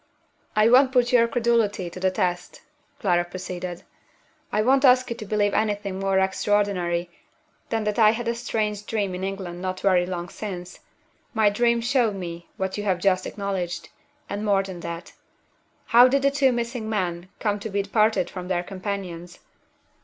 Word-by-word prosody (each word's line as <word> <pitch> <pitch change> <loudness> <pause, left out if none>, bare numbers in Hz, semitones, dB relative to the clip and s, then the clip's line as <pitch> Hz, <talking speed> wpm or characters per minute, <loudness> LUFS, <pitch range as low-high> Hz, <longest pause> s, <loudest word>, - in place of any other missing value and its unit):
"I 215 +1 +5
won't 260 +3 +6
put 245 -2 +2
your 235 -1 +6
credulity 230 -5 +1
to 170 +2 -8
the 190 0 +2
test," 180 -1 -2 0.4
Clara 175 -3 +2
proceeded. 180 0 -6 0.7
"I 210 +1 +1
won't 265 +3 +3
ask 255 -1 +6
you - - -1
to 215 - -8
believe 205 -1 +1
anything 205 -3 -1
more 195 0 +1
extraordinary 190 -3 0 0.6
than 225 -1 -1
that 210 +1 -1
I 215 -1 +7
had 230 +2 -1
a 235 - +1
strange 210 -3 -2
dream 205 -4 -1
in 180 +1 -5
England 190 -3 -5
not 185 0 -3
very 180 -3 +3
long 175 -1 -4
since. 180 -4 -7 0.6
My 215 -2 +4
dream 235 +2 +2
showed 240 -3 +1
me 170 -2 -7
what 190 +1 -2
you - - -3
have 190 -3 +1
just 185 0 +1
acknowledged 190 -4 -4 0.4
and 205 +1 -4
more 200 -2 +2
than 190 -2 -8
that. 170 0 -7 0.7
How 240 +2 +7
did 275 +2 +1
the 275 - +4
two 275 -2 +3
missing 235 -2 -3
men 180 -4 -2
come 205 -2 0
to 220 - -5
be 200 0 -1
parted 215 -2 +2
from 180 -1 -7
their 180 -1 0
companions? 185 -3 -6
200 Hz, 175 wpm, -24 LUFS, 185-225 Hz, 0.7 s, I